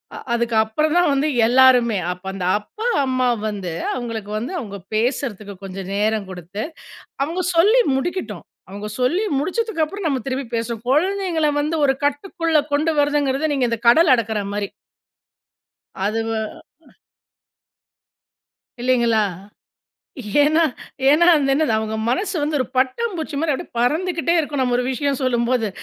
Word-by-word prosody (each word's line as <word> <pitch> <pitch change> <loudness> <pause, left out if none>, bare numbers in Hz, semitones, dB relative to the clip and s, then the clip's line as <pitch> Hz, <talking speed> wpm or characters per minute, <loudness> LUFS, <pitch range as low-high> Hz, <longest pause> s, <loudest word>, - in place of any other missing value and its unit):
அ - - -6 0.2
அதுக்கப்புறம் 235 +6 +1
தான் 350 -3 +4
வந்து 275 +2 +1 0.2
எல்லாருமே. 250 -3 +5
அப்போ 180 +1 -9
அந்த 185 -2 -4
அப்பா 435 - -6 0.2
அம்மா 255 -1 +1 0.2
வந்து, 195 -5 -4 0.2
அவங்களுக்கு 230 -4 -5
வந்து 235 +9 -4
அவுங்க 200 -4 -7 0.2
பேசறதுக்கு 220 -3 -2
கொஞ்சம் 190 0 -7
நேரம் 210 -1 0
குடுத்து, 185 +3 -6 0.6
அவுங்க 335 +6 -1
சொல்லி 425 +9 +5 0.2
முடிக்கட்டும். 350 +7 -3 0.3
அவுங்க 205 +2 -6
சொல்லி 320 +11 +2 0.2
முடிச்சதுக்கப்பறம் 375 +1 -2
நம்ம 275 -4 +1
திரும்பி 265 -1 -3
பேசுவோம். 230 -1 -3
குழந்தைங்கள 340 +2 +1
வந்து 305 +3 -1
ஒரு 270 - +4
கட்டுக்குள்ள 320 +2 0
கொண்டு 305 +3 +2
வரதுங்கிறது 290 0 +1
நீங்க 265 -3 +1
இந்த 230 - -1
கடல் 305 +3 +6
அடக்கற 220 -3 -1
மாரி. 205 -1 -2 1.4
அது 215 +3 0
வ - - -2 2.5
இல்லைங்களா? 235 -3 +2 1.2
ஏன்னா, 310 +3 +3 0.5
ஏன்னா 310 +4 +5
அது 275 -3 +2
என்னது 300 -3 +2
அவங்க 220 0 -3
மனசு 380 - -1
வந்து 295 +1 0
ஒரு 255 - +1
பட்டாம் 330 - +1
பூச்சி 315 -2 -5
மாரி 310 0 +1
அப்படியே 345 +6 -5
பறந்துகிட்டே 335 +7 +1
இருக்கும் 295 -3 -1
நம்ம 250 -1 +1
ஒரு 245 - 0
விஷயம் 280 0 -1
சொல்லும்போது. 240 -2 +1
260 Hz, 135 wpm, -21 LUFS, 225-315 Hz, 2.5 s, கடல்